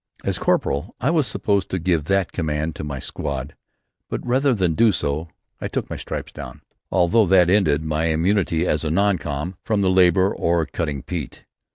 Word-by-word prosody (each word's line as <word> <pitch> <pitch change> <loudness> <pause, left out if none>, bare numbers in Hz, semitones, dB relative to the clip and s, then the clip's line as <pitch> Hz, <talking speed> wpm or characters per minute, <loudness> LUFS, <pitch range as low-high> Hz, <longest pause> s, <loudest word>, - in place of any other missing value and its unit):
As - - -1
corporal 75 - 0
I 140 - +1
was 155 -6 +2
supposed 100 -2 0
to 95 - -1
give 85 -4 0
that 95 0 +1
command 75 -1 -2
to - - -6
my 70 -2 -4
squad 70 +1 -5 0.5
but - - -4
rather 130 +3 +2
than 90 -5 +1
do 115 +6 +4
so 75 -2 -2 0.3
I - - -3
took - - -4
my - - -2
stripes - - -6
down, - - -9 0.3
although 95 +4 +3
that 90 -1 +5
ended 80 -7 +3
my 80 +1 -1
immunity 85 +1 +1
as 75 -3 0
a 80 - -1
"non 100 +2 +2
com" 75 +5 -4
from 105 -3 0
the 95 - +3
labour 95 +1 +4
of 85 -1 0
cutting 75 -6 -3
peat. 80 -8 -6
85 Hz, 190 wpm, -22 LUFS, 75-95 Hz, 0.5 s, that